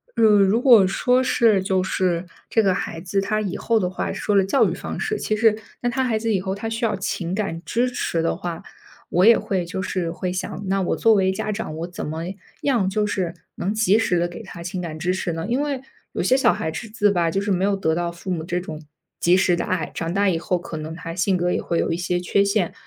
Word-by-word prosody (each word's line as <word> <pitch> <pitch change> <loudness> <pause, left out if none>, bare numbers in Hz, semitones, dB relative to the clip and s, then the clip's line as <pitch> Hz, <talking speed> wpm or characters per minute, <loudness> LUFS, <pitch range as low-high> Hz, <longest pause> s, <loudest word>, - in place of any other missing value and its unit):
呃， 230 - +2
如 210 +1 +5
果 230 -8 +7
说 250 +6 +2
是 225 -6 +3
就 190 -1 +1
是 185 -2 0 0.2
这 225 - +3
个 190 -2 +3
孩 165 -2 -4
子 190 +2 -1
他 215 +2 0
以 195 -4 -3
后 230 - +1
的 180 -3 0
话 185 - -3
说 205 - -1
了 195 - +5
教 270 +8 +3
育 - - -2
方 - - -6
式， 430 -1 -1
其 215 - 0
实 220 0 +4 0.3
那 245 - +1
他 265 +2 0
孩 235 -4 +1
子 225 0 0
以 195 - +2
后， 190 0 -3
他 225 +3 -4
需 225 +1 -1
要 215 - 0
情 185 -1 -3
感 195 -6 -2
支 245 +2 +1
持 170 -8 -1
的 165 - 0
话， 170 -2 -5 0.5
我 180 +2 +3
也 230 +1 +8
会 185 -3 -2
就 185 +2 -4
是 180 -3 -2
会 180 +2 -3
想， 185 +2 -4
那 195 +1 +1
我 180 - 0
作 225 - +4
为 190 -3 +3
家 215 - -3
长， 205 -7 -4
我 165 +2 -4
怎 180 - -6
么 160 +2 -4 0.4
样 235 -9 +2
就 210 +2 0
是 185 -4 -2 0.2
能 195 +4 -2
及 215 0 +3
时 185 -5 +1
地 170 0 +1
给 175 - -8
他 185 -5 -9
情 180 +1 -4
感 160 -3 -5
支 175 +3 0
持 185 -2 -2
呢？ 165 0 -4
因 250 +3 +1
为 285 -3 -2 0.3
有 - - -1
些 260 - +4
小 - - +4
孩 160 - -3
子 210 +1 0
吧， 170 -3 +1
就 195 +4 -1
是 200 0 -1
没 185 0 +2
有 200 0 +2
得 160 -5 0
到 175 +1 -1
父 175 +2 -6
母 170 -3 -1
这 175 0 -1
种 155 -3 -7 0.4
及 175 +2 +4
时 185 -2 +3
的 - - -2
爱， 175 -5 -2
长 165 0 -3
大 200 0 +3
以 165 -3 0
后 180 +2 0
可 170 -2 -7
能 155 +1 -6
他 165 -1 -6
性 185 +2 +1
格 180 0 0
也 - - 0
会 170 - -1
有 - - 0
一 165 - 0
些 180 0 -1
缺 180 +2 +2
陷， 200 -3 0
190 Hz, 280 characters per minute, -22 LUFS, 175-215 Hz, 0.5 s, 也